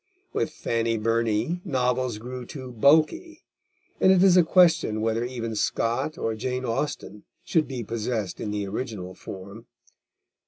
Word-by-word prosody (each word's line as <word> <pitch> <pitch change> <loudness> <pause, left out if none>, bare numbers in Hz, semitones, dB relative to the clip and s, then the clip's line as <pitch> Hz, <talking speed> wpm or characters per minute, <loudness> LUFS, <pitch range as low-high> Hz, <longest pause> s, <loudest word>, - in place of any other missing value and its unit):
With - - 0
Fanny 115 -6 -1
Burney, 115 +8 0
novels 125 -3 0
grow 125 +3 -7
too 130 +1 -8
bulky, 160 - +2 0.6
and 190 - +6
it 185 -1 +5
is 190 -2 +6
a 180 - +8
question 165 - +4
whether 115 +1 0
even 120 -2 -4
Scott 115 +8 -1
or 115 - -1
Jane 125 +3 -3
Austen 115 -3 -3 0.2
should 160 -2 +1
be 130 -3 -4
possessed 110 -2 -3
in 105 - -3
the 105 -1 -2
original 100 -3 -5
form. 100 +5 -10
120 Hz, 145 wpm, -25 LUFS, 110-145 Hz, 0.6 s, a